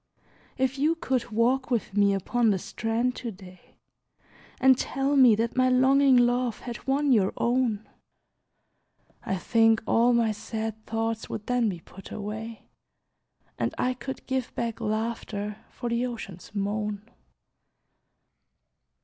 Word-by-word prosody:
If 265 Hz, +1 st, 0 dB
you 310 Hz, +4 st, +3 dB
could 260 Hz, -7 st, -2 dB
walk 245 Hz, +4 st, +1 dB
with 225 Hz, -5 st, -1 dB
me 200 Hz, -1 st, +4 dB
upon 230 Hz, +4 st, +1 dB
the 200 Hz, -, +2 dB
strand 230 Hz, +6 st, -2 dB
to 240 Hz, -, -4 dB
day, 185 Hz, -3 st, -14 dB, 0.8 s
And 260 Hz, 0 st, +6 dB
tell 270 Hz, +3 st, -1 dB
me 255 Hz, -5 st, +7 dB
that 230 Hz, +2 st, -1 dB
my 255 Hz, 0 st, +3 dB
longing 265 Hz, +1 st, +5 dB
love 245 Hz, -1 st, +2 dB
had 240 Hz, +1 st, -8 dB
won 280 Hz, +1 st, +2 dB
your 200 Hz, -6 st, +4 dB
own, 235 Hz, -3 st, 0 dB, 1.4 s
I 190 Hz, -, -1 dB
think 225 Hz, +3 st, +3 dB
all 235 Hz, +2 st, +4 dB
my 235 Hz, -2 st, +3 dB
sad 220 Hz, 0 st, -5 dB
thoughts 225 Hz, 0 st, -2 dB
would 210 Hz, -, -5 dB
then 245 Hz, -3 st, +1 dB
be 175 Hz, -4 st, -6 dB
put 195 Hz, +3 st, -13 dB
away, 220 Hz, +2 st, -6 dB, 1.0 s
And -, -, -1 dB
I 255 Hz, -, +1 dB
could 265 Hz, +1 st, -7 dB
give 260 Hz, -2 st, -2 dB
back 230 Hz, -2 st, -3 dB
laughter 215 Hz, -1 st, -3 dB
for 240 Hz, -, -5 dB
the 235 Hz, +2 st, 0 dB
Ocean's 205 Hz, -6 st, -9 dB
moan! 210 Hz, +1 st, -2 dB
230 Hz, 135 wpm, -27 LUFS, 210-255 Hz, 1.4 s, me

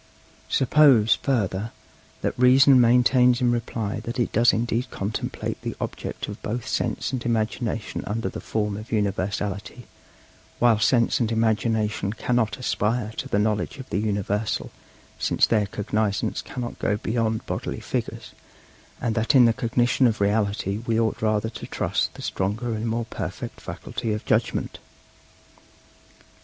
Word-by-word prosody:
Suppose, 130 Hz, -5 st, +5 dB
further, 110 Hz, -5 st, -1 dB, 0.5 s
that -, -, 0 dB
Reason 130 Hz, +1 st, +6 dB
maintains 125 Hz, +1 st, +4 dB
in 125 Hz, -2 st, +2 dB
reply 115 Hz, -3 st, -2 dB
that 120 Hz, +2 st, -5 dB
it 120 Hz, -, 0 dB
does 115 Hz, +2 st, +5 dB
indeed 120 Hz, +2 st, -1 dB
contemplate 105 Hz, 0 st, -4 dB
the -, -, -4 dB
object -, -, -5 dB
of 105 Hz, -, -8 dB
both 115 Hz, +2 st, -4 dB
Sense -, -, -1 dB
and 125 Hz, -2 st, -2 dB
Imagination 115 Hz, -1 st, -2 dB
under 110 Hz, +3 st, -2 dB
the -, -, -6 dB
form 105 Hz, -2 st, -2 dB
of 110 Hz, +2 st, -9 dB
universality, 100 Hz, +2 st, -2 dB, 0.7 s
while 115 Hz, -3 st, +4 dB
Sense 115 Hz, +2 st, +3 dB
and 115 Hz, -2 st, 0 dB
Imagination 110 Hz, -2 st, 0 dB
cannot 115 Hz, -3 st, 0 dB
aspire 110 Hz, -2 st, -1 dB
to -, -, -4 dB
the -, -, +1 dB
knowledge 105 Hz, +4 st, 0 dB
of 130 Hz, -1 st, -10 dB
the -, -, 0 dB
universal, 105 Hz, 0 st, -1 dB, 0.5 s
since -, -, +3 dB
their 105 Hz, -3 st, +1 dB
cognizance 105 Hz, +1 st, -1 dB
cannot 120 Hz, -1 st, -6 dB
go 105 Hz, -, 0 dB
beyond 110 Hz, 0 st, -1 dB
bodily -, -, -4 dB
figures, -, -, -4 dB, 0.7 s
and 115 Hz, -, -1 dB
that 115 Hz, +5 st, +1 dB
in 125 Hz, -2 st, +8 dB
the 115 Hz, -, +4 dB
cognition 120 Hz, +2 st, +2 dB
of 110 Hz, -, -1 dB
reality 100 Hz, -1 st, 0 dB
we 115 Hz, -1 st, +2 dB
ought 110 Hz, -1 st, 0 dB
rather 110 Hz, 0 st, +1 dB
to -, -, -8 dB
trust -, -, -1 dB
the -, -, -9 dB
stronger 110 Hz, +5 st, -2 dB
and 110 Hz, +1 st, -3 dB
more 115 Hz, +1 st, -1 dB
perfect -, -, -6 dB
faculty 110 Hz, -2 st, -4 dB
of 105 Hz, -, -5 dB
judgment. -, -, 0 dB
110 Hz, 145 wpm, -24 LUFS, 105-120 Hz, 0.7 s, in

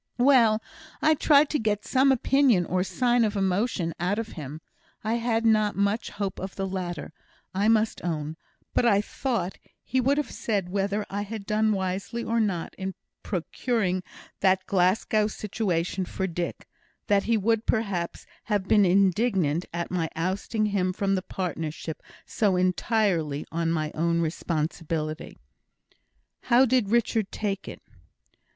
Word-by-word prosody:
"Well, 240 Hz, -4 st, +5 dB, 0.4 s
I 310 Hz, -, +4 dB
tried 295 Hz, -1 st, +4 dB
to 300 Hz, -, +1 dB
get 210 Hz, -2 st, -1 dB
some 270 Hz, +1 st, +4 dB
opinion, 260 Hz, -6 st, +3 dB
or 180 Hz, +2 st, 0 dB
sign 240 Hz, +3 st, +2 dB
of 210 Hz, -1 st, 0 dB
emotion, 190 Hz, -2 st, 0 dB
out 180 Hz, +4 st, 0 dB
of 225 Hz, 0 st, -3 dB
him. 150 Hz, -2 st, -7 dB, 0.4 s
I 220 Hz, +1 st, 0 dB
had 230 Hz, -1 st, 0 dB
not 215 Hz, -2 st, +3 dB
much 200 Hz, +3 st, 0 dB
hope 200 Hz, -2 st, -4 dB
of 190 Hz, +1 st, -6 dB
the 195 Hz, -, -2 dB
latter, 175 Hz, -5 st, -4 dB, 0.4 s
I 200 Hz, +3 st, +1 dB
must 220 Hz, 0 st, +2 dB
own; 155 Hz, -3 st, -3 dB, 0.4 s
but -, -, +2 dB
I 215 Hz, -4 st, +4 dB
thought 210 Hz, -3 st, -2 dB, 0.2 s
he 260 Hz, -, 0 dB
would 275 Hz, +3 st, +2 dB
have 295 Hz, -, -1 dB
said 200 Hz, -5 st, -2 dB
whether 200 Hz, +2 st, -1 dB
I 200 Hz, +1 st, -2 dB
had 205 Hz, 0 st, -6 dB
done 215 Hz, 0 st, +2 dB
wisely 195 Hz, +4 st, -2 dB
or 230 Hz, +1 st, 0 dB
not 195 Hz, -7 st, -1 dB
in 190 Hz, 0 st, -4 dB, 0.3 s
procuring 185 Hz, +1 st, -1 dB, 0.4 s
that 190 Hz, -1 st, +3 dB
Glasgow 200 Hz, +3 st, +2 dB
situation 190 Hz, -4 st, -2 dB
for 190 Hz, -, -3 dB
Dick 175 Hz, -1 st, -4 dB, 0.4 s
that 200 Hz, -1 st, +2 dB
he 230 Hz, 0 st, +2 dB
would, 225 Hz, +2 st, +1 dB
perhaps, 200 Hz, -7 st, -1 dB, 0.2 s
have 205 Hz, -3 st, 0 dB
been 205 Hz, -1 st, +5 dB
indignant 185 Hz, -3 st, +2 dB
at 170 Hz, +1 st, -4 dB
my 170 Hz, -3 st, -1 dB
ousting 195 Hz, +6 st, -1 dB
him 185 Hz, -2 st, +1 dB
from 195 Hz, +1 st, 0 dB
the 190 Hz, -, +1 dB
partnership 165 Hz, -4 st, -4 dB, 0.2 s
so 205 Hz, -4 st, +1 dB
entirely 180 Hz, -5 st, +1 dB
on 165 Hz, 0 st, 0 dB
my 155 Hz, -2 st, -1 dB
own 170 Hz, +1 st, +1 dB
responsibility." 160 Hz, -1 st, -3 dB, 1.1 s
"How 245 Hz, +2 st, +5 dB
did 250 Hz, -5 st, +2 dB
Richard 225 Hz, -2 st, +1 dB
take 195 Hz, -2 st, -3 dB
it?" -, -, -9 dB
200 Hz, 150 wpm, -26 LUFS, 180-225 Hz, 1.1 s, Well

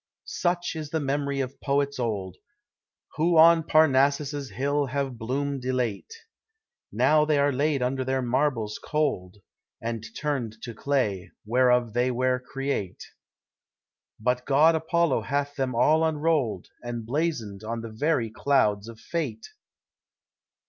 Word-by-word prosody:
Such 175 Hz, -1 st, -1 dB
is 155 Hz, -2 st, -5 dB
the 160 Hz, -, -1 dB
memory 140 Hz, -1 st, -1 dB
of 130 Hz, 0 st, -6 dB
poets 140 Hz, -1 st, 0 dB
old, 100 Hz, -6 st, -3 dB, 0.8 s
Who 165 Hz, +2 st, +3 dB
on 165 Hz, +1 st, +7 dB
Parnassus' 145 Hz, -2 st, +2 dB
hill 140 Hz, +1 st, -1 dB
have 135 Hz, -2 st, -3 dB
bloom'd 135 Hz, +3 st, -2 dB
elate; 125 Hz, -, -2 dB, 0.8 s
Now 155 Hz, 0 st, +4 dB
they 150 Hz, -1 st, +2 dB
are 140 Hz, 0 st, +3 dB
laid 140 Hz, 0 st, +1 dB
under 130 Hz, +1 st, -1 dB
their 130 Hz, 0 st, -1 dB
marbles 120 Hz, -4 st, 0 dB
cold, 130 Hz, -12 st, -1 dB, 0.4 s
And 115 Hz, -1 st, -4 dB, 0.2 s
turned 135 Hz, -7 st, -2 dB
to 120 Hz, -, -6 dB
clay, 110 Hz, -8 st, -1 dB, 0.2 s
whereof 125 Hz, 0 st, +2 dB
they 125 Hz, +2 st, +2 dB
were 125 Hz, +1 st, +1 dB
create; 135 Hz, -7 st, -4 dB, 1.2 s
But 125 Hz, +3 st, 0 dB
god 150 Hz, +4 st, +5 dB
Apollo 165 Hz, -1 st, +1 dB
hath 145 Hz, +1 st, -2 dB
them 130 Hz, -3 st, -2 dB
all 155 Hz, +7 st, +4 dB
enroll'd, 150 Hz, -, 0 dB
And 120 Hz, -2 st, -5 dB
blazon'd 120 Hz, -7 st, -2 dB
on 115 Hz, +1 st, -4 dB
the 115 Hz, -1 st, -7 dB
very 120 Hz, -1 st, 0 dB
clouds 110 Hz, -5 st, +1 dB
of 115 Hz, -1 st, -10 dB
Fate! 130 Hz, -10 st, -4 dB
135 Hz, 130 wpm, -26 LUFS, 120-145 Hz, 1.2 s, on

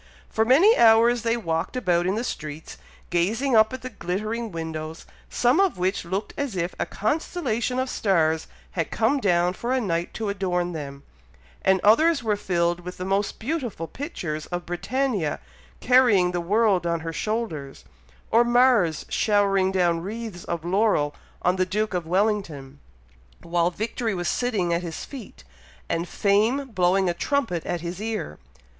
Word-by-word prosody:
For 220 Hz, -, +2 dB
many 330 Hz, -, +6 dB
hours 230 Hz, +1 st, +5 dB
they 230 Hz, +1 st, +1 dB
walked 165 Hz, -1 st, -2 dB
about 180 Hz, -7 st, +1 dB
in 190 Hz, -, +1 dB
the 230 Hz, -, -2 dB
streets, 155 Hz, -8 st, -6 dB, 0.3 s
gazing 225 Hz, +10 st, +1 dB
up 220 Hz, +1 st, +5 dB
at 260 Hz, 0 st, -7 dB
the 255 Hz, -, -4 dB
glittering 215 Hz, +4 st, -3 dB
windows, 160 Hz, -1 st, -6 dB, 0.2 s
some 245 Hz, +6 st, +2 dB
of 390 Hz, -, +2 dB
which 185 Hz, +1 st, -1 dB
looked 195 Hz, +4 st, -3 dB
as 280 Hz, -7 st, -3 dB
if 175 Hz, 0 st, -2 dB
a -, -, -1 dB
constellation 250 Hz, -, -1 dB
of 260 Hz, +1 st, 0 dB
stars 160 Hz, -9 st, +1 dB, 0.2 s
had 165 Hz, -4 st, -2 dB
come 230 Hz, +6 st, +1 dB
down 180 Hz, -5 st, +2 dB
for 235 Hz, +6 st, -4 dB
a 260 Hz, -, +2 dB
night 175 Hz, -6 st, -2 dB
to 215 Hz, -2 st, -2 dB
adorn 180 Hz, -3 st, -1 dB
them; 140 Hz, -3 st, -7 dB, 0.6 s
and 190 Hz, 0 st, +3 dB
others 280 Hz, +7 st, +4 dB
were 215 Hz, -2 st, +1 dB
filled 175 Hz, -3 st, 0 dB
with 180 Hz, +1 st, -8 dB
the 185 Hz, -, -5 dB
most 195 Hz, +2 st, -1 dB
beautiful 240 Hz, -, -3 dB
pictures 165 Hz, -, -5 dB
of 175 Hz, -1 st, -4 dB
Britannia 205 Hz, -, -1 dB, 0.4 s
carrying 235 Hz, -8 st, +4 dB
the 175 Hz, -1 st, -2 dB
world 195 Hz, -1 st, +2 dB
on 170 Hz, -1 st, -1 dB
her 165 Hz, 0 st, -5 dB
shoulders; 160 Hz, -, -4 dB, 0.5 s
or 230 Hz, +1 st, +6 dB
Mars 240 Hz, -, +3 dB
showering 200 Hz, -3 st, +2 dB
down 175 Hz, -3 st, +1 dB
wreaths 210 Hz, -1 st, -6 dB
of 170 Hz, -1 st, -4 dB
laurel 180 Hz, -6 st, +2 dB, 0.3 s
on 180 Hz, +1 st, +2 dB
the 185 Hz, -, +3 dB
Duke 210 Hz, +3 st, -1 dB
of 175 Hz, -3 st, -2 dB
Wellington, 175 Hz, -8 st, -1 dB, 0.6 s
while 170 Hz, 0 st, +1 dB
victory 220 Hz, +3 st, -3 dB
was 175 Hz, -1 st, -3 dB
sitting 205 Hz, -9 st, 0 dB
at 170 Hz, -, 0 dB
his 170 Hz, -2 st, -6 dB
feet, 240 Hz, -, -11 dB, 0.4 s
and 170 Hz, +1 st, -2 dB
fame 225 Hz, +7 st, +1 dB
blowing 185 Hz, 0 st, +2 dB
a 175 Hz, -, +1 dB
trumpet 185 Hz, -, -1 dB
at 175 Hz, -2 st, -2 dB
his 175 Hz, +3 st, -5 dB
ear. 215 Hz, -, -4 dB
195 Hz, 165 wpm, -24 LUFS, 170-230 Hz, 0.6 s, many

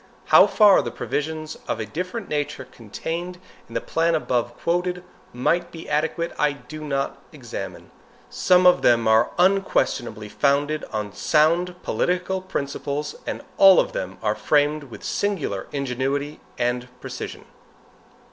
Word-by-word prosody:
How -, -, +8 dB
far 210 Hz, -3 st, +6 dB
the -, -, -4 dB
provisions 155 Hz, +1 st, -4 dB
of -, -, -2 dB
a 110 Hz, -, -2 dB
different 180 Hz, -, -5 dB
nature 145 Hz, -3 st, -3 dB
contained 165 Hz, -, -6 dB, 0.3 s
in -, -, -12 dB
the -, -, 0 dB
plan 165 Hz, 0 st, +1 dB
above 120 Hz, -5 st, -1 dB
quoted 180 Hz, +1 st, -1 dB, 0.3 s
might 170 Hz, +8 st, 0 dB
be 165 Hz, -1 st, -9 dB
adequate, 160 Hz, +3 st, -1 dB
I 150 Hz, -1 st, +3 dB
do 145 Hz, +3 st, -10 dB
not 140 Hz, -2 st, -2 dB
examine. -, -, -8 dB, 0.4 s
Some 180 Hz, 0 st, +3 dB
of 180 Hz, -, +6 dB
them 115 Hz, -2 st, +4 dB
are 110 Hz, +1 st, +4 dB
unquestionably 175 Hz, -, +1 dB
founded 145 Hz, +6 st, +1 dB
on 105 Hz, -2 st, -4 dB
sound 170 Hz, +3 st, +2 dB
political 180 Hz, +1 st, -1 dB
principles, 145 Hz, -3 st, -3 dB
and -, -, -4 dB
all 195 Hz, -1 st, +8 dB
of -, -, +1 dB
them 95 Hz, 0 st, -4 dB
are 105 Hz, -1 st, +2 dB
framed 150 Hz, +4 st, +1 dB
with 125 Hz, -, -12 dB
singular 165 Hz, -, -2 dB
ingenuity 140 Hz, +2 st, -2 dB, 0.2 s
and 120 Hz, 0 st, -1 dB
precision. -, -, -7 dB
150 Hz, 140 wpm, -23 LUFS, 125-175 Hz, 0.4 s, How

